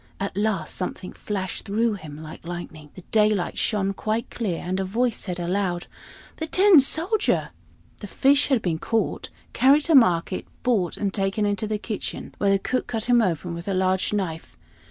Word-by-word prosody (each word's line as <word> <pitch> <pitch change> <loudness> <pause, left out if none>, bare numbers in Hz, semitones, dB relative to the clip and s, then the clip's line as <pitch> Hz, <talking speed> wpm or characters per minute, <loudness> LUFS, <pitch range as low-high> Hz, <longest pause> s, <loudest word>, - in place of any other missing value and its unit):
At 195 -1 -3
last 200 -6 -1
something 185 0 -4
flashed 190 -3 -4
through 220 +3 +1
him 155 -6 -9
like 155 - -10
lightning. 165 -3 -8
The 185 - -11
daylight 210 -4 +2
shone 195 -3 0
quite 220 +3 -2
clear, 200 -8 -2
and 185 +2 -2
a - - 0
voice 230 +5 0
said 180 -2 -4
aloud, 175 0 -1 0.5
"The 320 - -3
Tin 375 -1 +6
Soldier!" 345 +10 +1 0.5
The 205 - -7
fish 275 +7 +3
had 260 -6 +1
been 165 -3 -1
caught, 225 +4 -1 0.2
carried 280 +3 +5
to 330 - +1
market, 185 - +3 0.2
bought, 210 -9 +1
and 200 -2 -2
taken 195 +1 0
into 205 +1 -1
the 215 0 -1
kitchen, 210 0 -5
where 200 - +2
the 195 - +4
cook 255 +6 -2
cut 225 -3 -3
him 240 -1 +4
open 175 -3 -1
with 170 +2 -7
a 195 - 0
large 185 0 +1
knife. 180 -6 -4
200 Hz, 180 wpm, -24 LUFS, 180-230 Hz, 0.5 s, Tin